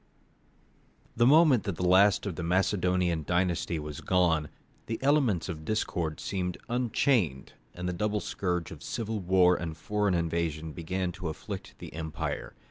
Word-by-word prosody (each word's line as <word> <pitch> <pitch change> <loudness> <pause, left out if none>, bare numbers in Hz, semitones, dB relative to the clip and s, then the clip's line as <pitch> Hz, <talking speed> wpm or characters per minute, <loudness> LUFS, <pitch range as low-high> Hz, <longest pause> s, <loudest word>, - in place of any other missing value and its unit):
The 120 +1 +4
moment 150 -4 +6
that 100 - -2
the 90 - -2
last 100 +3 +5
of 100 -5 -3
the 90 - -5
Macedonian 90 -1 +1
dynasty 85 0 0
was 75 -2 -6
gone, 85 -5 +2 0.4
the 115 - -2
elements 135 - +2
of 80 -4 -6
discord 85 -5 -2
seemed 90 -2 -3
unchained, 120 - +1 0.2
and 90 +1 -4
the 90 - -1
double 105 +3 0
scourge 90 -4 -2
of - - -10
civil 110 -1 -3
war 90 -1 +4
and 80 -2 -5
foreign 105 -3 0
invasion 80 -2 -1
began 90 +2 -2
to 90 0 -6
afflict 80 - -7
the - - -10
empire. 80 0 -4
90 Hz, 150 wpm, -29 LUFS, 85-105 Hz, 0.4 s, moment